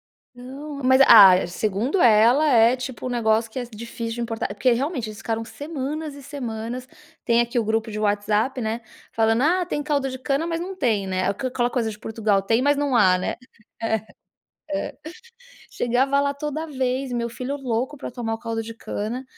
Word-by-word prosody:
Então, 275 +4 -10
mas, 260 +1 +5
ah, 185 -3 +8
segundo 215 - -1
ela 235 +7 +5
é 235 -1 +5
tipo 255 0 -6
um - - -1
negócio 225 -2 +1
que 255 - -6
é 245 - -3
difícil 230 0 -6
de - - -4
importar, 225 -1 -3
porque 230 +5 +2
realmente 255 -2 -2
eles 210 0 -9
ficaram 225 0 -3
semanas 295 +1 -5
e 285 - -11
semanas, 250 -3 -5 0.4
tem 235 0 +3
aqui 240 +1 0
o 225 - +1
grupo 220 +1 -1
de 215 - -5
WhatsApp, 210 +5 0
né, 225 +1 -2 0.3
falando: 225 +2 +2
"Ah 355 +4 +2
tem 295 -5 -2
caldo 285 -2 0
de 260 - -6
cana" 275 +5 -1
mas 330 0 -2
não 380 +2 -5
tem, 220 - 0
né, 185 0 -1
aquela 245 +3 -1
coisa 230 -3 -1
de 210 - -10
Portugal 215 -3 0
tem 225 +4 +2
mas 285 0 +3
não 285 -3 0
há, 185 -5 +5
né? - - -3 0.5
É, 220 -2 0 0.7
é 295 - -3 0.7
chegava 265 +4 +1
lá 280 0 0
toda 300 +2 -4
vez 260 -2 -2
meu 235 -1 -1
filho 255 +4 -4
louco 260 +2 -2
pra 270 - -7
tomar 235 -2 -3
o - - -6
caldo 225 -1 -3
de 225 +1 -8
cana, 230 +4 -5
240 Hz, 190 wpm, -23 LUFS, 225-275 Hz, 0.7 s, ah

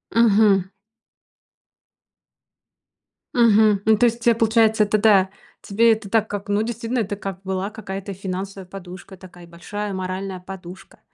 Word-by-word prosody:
Мгм. 205 -4 +4 2.6
Мгм. 215 -4 +4
Ну, 220 -1 +4
то 245 - +3
есть, 235 0 -1
э, 235 - +5
получается, 220 -1 +3
это, 210 +1 +1
да, 200 -3 +4 0.3
тебе 225 +3 +3
это 215 -2 -7
так 220 0 +1
как, 205 0 -6
ну, 205 +2 +1
действительно, 235 +1 -3
это 205 -1 -2
как 195 -2 -7
была 190 +1 -3
какая-то 195 -2 -7
финансовая 190 0 -6
подушка, 185 0 -10
такая 175 -1 -14
большая 205 +4 -6
моральная 185 0 -4
подушка. 185 0 -11
200 Hz, 135 wpm, -22 LUFS, 190-220 Hz, 2.6 s, э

